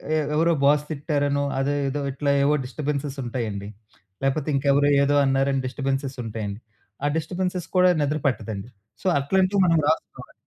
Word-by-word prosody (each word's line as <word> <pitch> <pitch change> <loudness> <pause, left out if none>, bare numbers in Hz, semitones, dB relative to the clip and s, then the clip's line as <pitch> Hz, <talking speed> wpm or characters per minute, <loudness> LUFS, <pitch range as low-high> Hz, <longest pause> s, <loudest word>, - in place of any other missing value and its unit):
ఎ - - +3 0.2
ఎవరో 165 +2 +3
బాస్ 145 +1 +4
తిట్టారనో, 145 -2 0 0.2
అదేదో 140 0 -1
ఇట్లా 140 +2 0
ఏవో 145 +2 +3
డిస్టబెన్సెస్ 140 +1 -3
ఉంటాయండి. 115 -5 -4 0.6
లేపోతే 135 +2 0
ఇంకెవరో 140 +1 +3
ఏదో 145 +1 +2
అన్నారని 135 0 +1
డిస్టబెన్సెస్ 135 0 -3
ఉంటాయండి. 110 -2 -5 0.5
ఆ - - +3
డిస్టబెన్సెస్ 180 +2 -3
కూడా 180 0 +6
నిద్ర 145 +1 0
పట్టదండి. 110 -4 -3 0.3
సో, - - -3
అట్లాంటివి 190 +7 +2
మనం 165 -2 +4
రాసుకోవాలి. 160 - -2
140 Hz, 140 wpm, -24 LUFS, 135-155 Hz, 0.6 s, కూడా